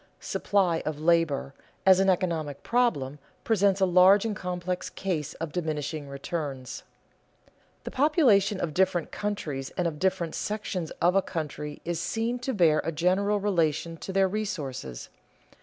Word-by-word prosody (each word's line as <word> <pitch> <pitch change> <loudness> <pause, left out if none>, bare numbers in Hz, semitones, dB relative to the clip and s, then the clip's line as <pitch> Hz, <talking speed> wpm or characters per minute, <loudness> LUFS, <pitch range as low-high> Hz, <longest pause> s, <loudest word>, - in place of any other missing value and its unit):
"Supply 185 -5 +1
of 155 -1 -3
labor," 160 -4 +2 0.3
as 190 -1 +7
an 195 0 +3
economic 165 -6 -1
problem, 150 - 0 0.2
presents 200 -3 +2
a 190 - +4
large 185 +3 +6
and 215 -2 -1
complex 180 -1 -3
case 160 -7 -3
of 165 -2 -5
diminishing 155 -3 -3
returns. 140 -2 -5 1.0
The - - -6
population 255 - +3
of 155 - -2
different 180 -2 +1
countries 155 -10 -3
and 180 -2 +1
of 150 -3 -5
different 175 -3 0
sections 200 -5 -3
of 175 +1 +5
a 195 - +5
country 150 -4 -5
is 170 -1 -2
seen 230 +6 -1
to 250 +2 -2
bear 165 -5 +4
a - - -2
general 190 +6 +1
relation 165 -5 0
to 190 - -6
their 195 0 +3
resources. 150 - -4
175 Hz, 145 wpm, -27 LUFS, 155-195 Hz, 1.0 s, as